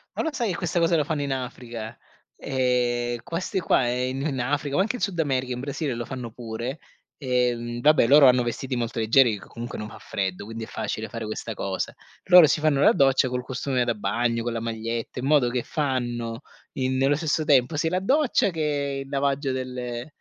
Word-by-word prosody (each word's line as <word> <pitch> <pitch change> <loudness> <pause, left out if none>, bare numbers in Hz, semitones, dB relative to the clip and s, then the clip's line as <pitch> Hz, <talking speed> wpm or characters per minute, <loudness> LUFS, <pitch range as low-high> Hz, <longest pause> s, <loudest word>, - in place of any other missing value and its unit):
ma - - -1
lo 320 - 0
sai 240 -5 -1
che 175 - -3
questa 175 -1 -1
cosa 170 0 +3
la 150 - +2
fanno 150 0 -2
in 140 -1 -2
Africa, 120 -3 -6 0.4
ehm, 120 -2 0
queste 180 +4 -3
qua 130 -6 +2
in 125 +2 -1
in 140 -3 -2
Africa, 140 +2 -1
ma 190 - +4
anche 225 +5 -1
in - - -12
Sud 195 -4 -1
America, 130 -4 0
in 125 - -5
Brasile 140 0 -3
lo 120 0 -4
fanno 125 -3 -6
pure, 120 +4 -5 0.4
ehm, 120 -3 -1
vabbè, 150 -3 +5
loro 140 +1 +8
hanno 125 -1 +5
vestiti 125 +2 -3
molto 120 -1 -2
leggeri 115 -1 +4
che - - -13
comunque 120 +1 -7
non 105 - -5
fa - - -12
freddo, 95 -2 -3
quindi 115 +1 -6
è - - -17
facile 110 +1 -4
fare 115 +1 -6
questa 110 +1 -5
cosa. 95 -2 -3 0.3
Loro 180 -3 +8
si 150 - +1
fanno 150 -2 +2
la - - +7
doccia 135 -1 +3
col 125 0 -3
costume 130 -1 -1
da 120 - +1
bagno, 115 +2 -1
con 120 - -2
la 115 - -2
maglietta, 115 +1 -4
in 125 - -3
modo 140 -4 +4
che 120 -1 -2
fanno 120 -5 -2 0.3
in 130 0 -1
nello 135 +2 +3
stesso 155 0 -1
tempo, 140 +1 +3
sia 160 +2 +1
la 180 +2 0
doccia 265 0 +2
che 145 -4 -2
il - - -15
lavaggio 140 0 0
del 130 -1 -4
ehm, 120 0 -5
130 Hz, 215 wpm, -25 LUFS, 120-145 Hz, 0.4 s, loro